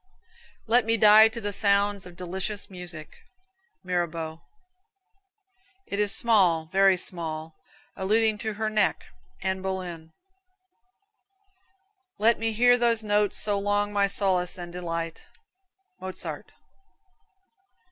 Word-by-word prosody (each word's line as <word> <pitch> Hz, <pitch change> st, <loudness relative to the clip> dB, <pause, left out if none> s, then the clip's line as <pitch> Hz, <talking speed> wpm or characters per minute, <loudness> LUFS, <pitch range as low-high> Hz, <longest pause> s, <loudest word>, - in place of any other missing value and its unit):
"Let 240 Hz, +2 st, +3 dB
me 230 Hz, 0 st, +2 dB
die 215 Hz, +1 st, +8 dB
to 225 Hz, +1 st, -6 dB
the 205 Hz, -2 st, -3 dB
sounds 200 Hz, -1 st, +1 dB
of 175 Hz, -, -13 dB
delicious 190 Hz, +3 st, -4 dB
music." 175 Hz, -4 st, -5 dB, 0.6 s
Mirabeau. 170 Hz, -3 st, -3 dB, 1.4 s
"It 200 Hz, -, -4 dB
is 205 Hz, -1 st, +4 dB
small, 185 Hz, -10 st, +3 dB
very 195 Hz, -1 st, +4 dB
small," 160 Hz, -3 st, -5 dB, 0.4 s
alluding 215 Hz, +2 st, +1 dB
to 220 Hz, 0 st, -3 dB
her 220 Hz, +1 st, -2 dB
neck. 215 Hz, -2 st, 0 dB, 0.4 s
Anna 190 Hz, 0 st, -1 dB
Boleyn. 180 Hz, -4 st, -5 dB, 2.1 s
"Let 225 Hz, +2 st, +3 dB
me 225 Hz, 0 st, -1 dB
hear 245 Hz, +3 st, +4 dB
those 230 Hz, -2 st, +2 dB
notes 205 Hz, -1 st, +1 dB
so 205 Hz, -1 st, -1 dB
long 205 Hz, +1 st, -1 dB
my 200 Hz, -1 st, +2 dB
solace 185 Hz, -3 st, -1 dB
and 175 Hz, -1 st, -8 dB
delight." 165 Hz, -2 st, -4 dB, 0.8 s
Mozart. 185 Hz, 0 st, -6 dB
195 Hz, 110 wpm, -26 LUFS, 180-215 Hz, 2.1 s, die